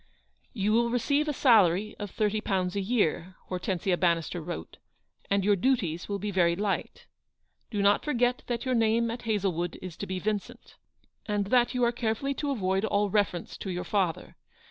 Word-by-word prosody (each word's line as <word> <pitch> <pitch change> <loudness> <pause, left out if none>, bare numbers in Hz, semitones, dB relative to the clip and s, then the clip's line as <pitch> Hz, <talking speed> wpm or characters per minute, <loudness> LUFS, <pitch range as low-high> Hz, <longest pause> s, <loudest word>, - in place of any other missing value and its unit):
" - - -44
You 210 -2 0
will 235 +1 +3
receive 280 +5 +1
a - - +1
salary 215 - +4
of 205 -1 -4
thirty 210 +2 0
pounds 185 -3 -1
a 200 - 0
year," 185 -4 0 0.2
Hortensia 180 0 -1
Bannister 170 -1 0
wrote, 155 - -7
u - - -38
and 200 -1 +1
your 205 0 +4
duties 185 -7 0
will 200 - -1
be 205 +1 -3
very 170 -3 +3
light. 200 +1 -3 0.6
Do 205 -3 -1
not 200 +1 +4
forget 250 -3 +1
that 240 +1 -2
your 255 - +1
name 230 0 +2
at 240 +1 -6
Hazlewood 180 -5 -1
is 185 -3 -8
to 200 - -5
be 185 - -3
Vincent, 215 +5 -4 0.5
and 205 -1 0
that 245 0 +3
you 250 - +1
are 235 - +4
carefully 235 +3 -1
to 290 +1 -3
avoid 195 -6 0
all 205 -2 +1
reference 190 -5 0
to 195 - -5
your 180 -1 -3
father. 185 -6 -1
205 Hz, 190 wpm, -28 LUFS, 185-235 Hz, 0.6 s, salary